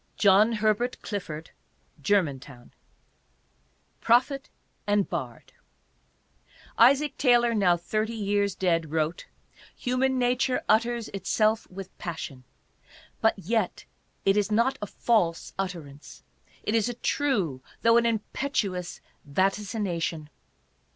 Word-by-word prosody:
JOHN 205 +3 +5
HERBERT 220 +3 0
CLIFFORD: 165 -6 -5 0.5
Germantown. 140 -8 -1 1.3
PROPHET 260 +4 +2 0.4
AND 205 -1 +2
BARD. 130 -9 -6 1.2
Isaac 275 +5 +4
Taylor, 240 -3 +4
now 185 -5 +3
thirty 215 +6 -2
years 205 -2 0
dead, 165 -4 0
wrote: 160 +2 -2 0.5
"Human 260 +1 0
nature 250 +1 +1
utters 230 +1 +2
itself 215 +3 0
with 190 0 -9
passion; 140 -6 -6 0.8
but 225 - +3
yet 200 +1 -1 0.4
it 195 - +4
is 210 0 +1
not 235 +5 +2
a 205 - -3
false 185 -7 0
utterance; 160 -7 -6 0.4
it 210 - -1
is 230 +1 +2
a 245 - -4
true 205 - 0 0.2
though 230 0 +6
an 235 0 +3
impetuous 210 -5 -2 0.2
vaticination." 185 -2 -1
205 Hz, 105 wpm, -27 LUFS, 175-235 Hz, 1.3 s, though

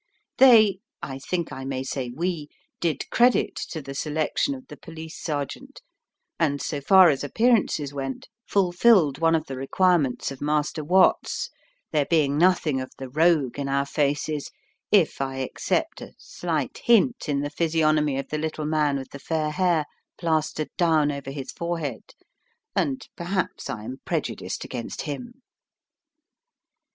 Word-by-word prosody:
They 220 -7 +7 0.2
I 135 0 -5
think 170 +4 -3
I 135 - -6
may 130 -1 -3
say 130 -2 -3
we 155 +2 -3 0.3
did 160 -5 -1
credit 245 +1 +3
to 160 -4 -5
the 135 - -7
selection 155 - -1
of 260 -1 -11
the - - -10
police 160 -1 -10
sergeant, 155 - -4 0.6
and, 145 -4 +1
so 145 +1 -3
far 185 +4 +7
as 140 - -2
appearances 195 - +1
went, 135 -1 -5 0.2
fulfilled 180 - +4
one 165 0 +4
of 160 -1 -1
the 135 - -6
requirements 145 -1 +1
of 135 - -9
Master 150 +1 0
Watts, 185 +5 +2 0.4
there 150 -3 +1
being 150 -4 +3
nothing 160 -5 +3
of 130 - -6
the 135 -1 -7
rogue 150 -2 +2
in 140 -1 -2
our 140 0 +1
faces, 145 +1 -1 0.4
if 185 -9 +3
I 135 -1 -2
except 130 - -2
a - - -10
slight 160 -6 -3
hint 235 - +3
in 140 -1 +1
the 145 0 -3
physiognomy 155 -3 +1
of 135 - -4
the 155 - -2
little 155 -1 -3
man 150 -2 +1
with 135 -1 -8
the 140 - -8
fair 155 +1 -1
hair 175 -3 +1 0.3
plastered 155 -2 -1
down 160 -4 +3
over 140 -1 -6
his 135 -1 -6
forehead, 165 -8 -4 0.6
and 135 -2 -1
perhaps 180 +2 -3
I 105 - -5
am 125 +4 -6
prejudiced - - -3
against 120 -2 -5
him. 245 - -7
155 Hz, 150 wpm, -25 LUFS, 140-175 Hz, 0.6 s, They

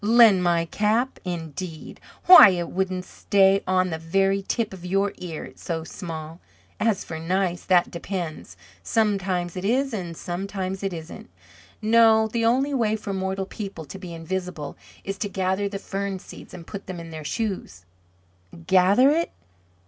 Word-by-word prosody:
"Lend 220 -3 +6
my 170 -1 +2
cap, 215 +8 0
indeed! 165 -1 -6 0.3
Why 365 - +11
it 175 -2 -2
wouldn't 185 -1 -2
stay 195 0 +3
on 185 -1 +2
the 160 - -3
very 195 +4 +1
tip 215 +2 -2
of 185 -2 -10
your 195 +2 0
ear, 165 -4 -6
it's - - -14
so 165 -2 -3
small. 160 -1 -7 0.4
As 215 -3 +1
for 160 -1 -6
nice, 180 +1 -1
that 180 -2 +3
depends. 170 -2 -5 0.2
Sometimes 195 -5 0
it 185 - -5
is, 260 +5 +1
and 175 -6 -5
sometimes 190 +1 -4
it 195 -1 -2
isn't. 165 -1 -9 0.5
No, 220 0 +5
the 230 +1 -2
only 260 +5 +2
way 220 -5 +1
for 205 -2 -5
mortal 190 0 -2
people 195 -5 -7
to 190 +7 -9
be 180 -3 -8
invisible 170 -1 -5 0.3
is 195 0 -5
to 205 - -2
gather 190 +1 -1
the 200 - -4
fern 195 0 -4
seed - - -12
and 170 -2 -10
put 200 0 -8
it 180 -2 -5
in 165 -1 -9
their 155 -1 -7
shoes." 185 - -4 0.8
"Gather 195 +9 +5
it? 335 +2 0
190 Hz, 165 wpm, -24 LUFS, 175-205 Hz, 0.8 s, Why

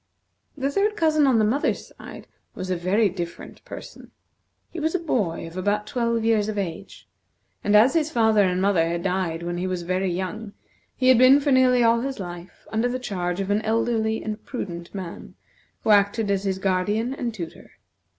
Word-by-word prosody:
The 275 0 -1
third 415 +6 +1
cousin 310 -3 +3
on 255 -4 +4
the 215 - +3
mother's 255 +7 -1
side - - -11 0.3
was 185 0 -5
a - - +1
very 190 +5 +2
different 175 -2 -7
person. - - -10 0.6
He 345 - -6
was 315 +3 -1
a - - +1
boy 220 - -1
of 165 +1 -10
about 205 +3 0
twelve 235 -2 -1
years 215 -2 +2
of 215 - -4
age; 195 -1 -6 0.6
and 205 - +2
as 225 +5 +6
his 320 -2 +1
father 220 -7 +3
and 185 -2 +1
mother 185 -4 +2
had 170 0 -3
died 180 -3 -1
when 175 0 -3
he 185 - -2
was 180 -2 -3
very 185 +2 -1
young, 200 +4 -4 0.4
he 255 0 +2
had 255 -2 +6
been 260 +2 +7
for 285 0 0
nearly 255 -2 +4
all 230 0 +4
his 270 -1 -4
life 175 -1 -9
under 225 +3 +1
the 250 - -2
charge 180 -7 -3
of 195 0 -2
an 205 +1 +2
elderly 220 0 0
and 215 0 -5
prudent 175 -10 -6
man, 185 -3 -8 0.5
who 220 - +3
acted 205 +1 +3
as 200 0 -1
his 190 -1 0
guardian 200 +6 0
and 245 -3 -3
tutor. 170 -5 -9
210 Hz, 195 wpm, -24 LUFS, 185-245 Hz, 0.6 s, been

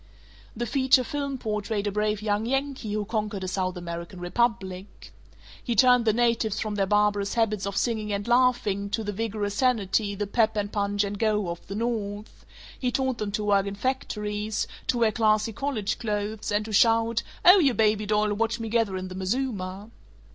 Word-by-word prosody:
The 240 +2 -2
feature 260 +2 +3
film 280 +1 -3
portrayed 210 -2 -2
a 205 - 0
brave 210 +1 -1
young 210 +1 0
Yankee 270 -4 -2
who 210 0 -1
conquered 210 -2 -3
a - - -3
South 185 -1 -2
American 170 +1 -6
republic. 190 - -2 0.5
He 240 - -1
turned 250 0 +5
the 220 - +5
natives 230 -2 +1
from 215 -1 -2
their 200 -1 0
barbarous 205 0 +1
habits 215 -4 0
of 200 - -4
singing 220 -3 -1
and 200 +1 -2
laughing 240 -5 +2
to 220 +2 -2
the 205 - -3
vigorous 210 -1 -2
sanity, 210 -4 +1
the 205 +1 -2
Pep 220 +1 +1
and 205 -1 -2
Punch 205 0 0
and 200 0 -4
Go, 210 -4 +1
of 170 0 -7
the 195 - -5
North; 215 -2 -4 0.3
he 250 -1 0
taught 260 -1 -1
them 210 -1 -2
to 210 - -1
work 200 -1 +2
in 200 - -4
factories, 210 -3 -2 0.2
to 245 - +1
wear 230 -2 +3
Klassy 215 0 +2
Kollege 240 -6 -2
Klothes, 210 -1 -3
and 205 +1 +1
to 215 - -6
shout, 225 +1 +3 0.2
"Oh, 365 +3 +9
you 275 -8 +3
baby 215 -1 +2
doll, 210 0 +2
watch 225 +2 -1
me 225 -1 -4
gather 220 -4 +1
in 185 0 -5
the 185 - -8
mazuma." 195 0 -3
210 Hz, 190 wpm, -26 LUFS, 200-230 Hz, 0.5 s, Oh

